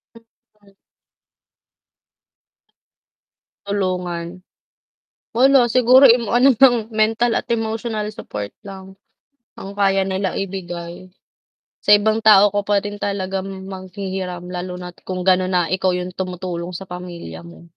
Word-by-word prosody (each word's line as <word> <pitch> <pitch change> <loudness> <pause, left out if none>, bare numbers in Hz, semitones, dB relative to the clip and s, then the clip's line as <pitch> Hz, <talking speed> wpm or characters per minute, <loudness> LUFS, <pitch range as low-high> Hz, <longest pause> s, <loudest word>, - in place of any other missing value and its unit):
Hmm. 215 -3 -24 2.9
Tulungan. 180 -3 -3 0.9
Wala, 260 -1 +5
siguro 255 +3 +6
ano 240 +2 +4
nang 240 -4 +4
mental 225 +1 +1
at - - -1
emotional 225 -1 -2
support 105 - -6 0.2
lang, 190 -1 -11 0.6
ang 200 +1 -9
kaya 195 -1 +2
nila 190 0 -1
ibibigay. 180 -2 -6 0.7
Sa - - 0
ibang 220 +2 0
tao 205 -2 +6
ko 205 - +1
pa 205 0 +1
rin 205 +1 -5
talagang 190 -1 -4
maghihiram, 185 -1 -6
lalo 180 0 -6
na't 180 -1 -10
kung 185 -1 -5
ganun 185 0 +3
na 180 -2 +1
ikaw 185 +1 0
yung 180 0 -4
tumutulong 180 -2 -5
sa 185 +2 -8
pamilya 180 -1 -8
mo. 170 0 -14
190 Hz, 115 wpm, -20 LUFS, 180-215 Hz, 2.9 s, siguro